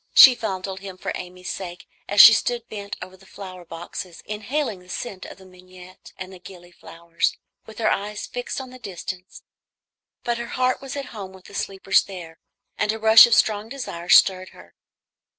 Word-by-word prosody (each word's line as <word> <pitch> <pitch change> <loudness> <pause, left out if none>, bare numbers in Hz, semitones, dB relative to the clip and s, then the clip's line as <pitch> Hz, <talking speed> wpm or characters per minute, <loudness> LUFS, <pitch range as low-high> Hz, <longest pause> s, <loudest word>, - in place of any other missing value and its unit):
She 260 - +11
fondled 190 -5 -4
him 190 -1 -9
for - - -4
Amy's 180 0 -7
sake 175 -2 -8 0.2
as 205 - 0
she 220 - +12
stood 235 +2 -1
bent 200 -1 -7
over 185 - -12
the 190 +1 -20
flower 185 -2 -10
boxes, 170 +1 -8
inhaling 215 +1 -3
the 180 0 -19
scent 190 -1 -6
of - - -11
the 190 - -16
mignonette 185 0 -15
and 185 -1 -10
gilly 180 -1 -13
flowers, 170 0 -3 0.3
with 220 -1 -12
her 225 - +1
eyes 210 +1 -3
fixed 245 +2 -5
on 260 -1 -8
the 255 - -12
distance; 185 -3 -8 0.8
but 235 0 -1
her 235 - -5
heart 255 0 +1
was 270 0 -7
at 275 -2 -5
home 195 -3 -8
with 190 0 -16
the - - -14
sleepers 195 -1 +1
there, 175 -4 -10 0.4
and 210 - +2
a 220 - -4
rush 220 +1 +8
of 235 - +3
strong 215 0 +1
desire 180 -10 -7
stirred 185 0 +5
her. - - -17
195 Hz, 185 wpm, -23 LUFS, 180-220 Hz, 0.8 s, she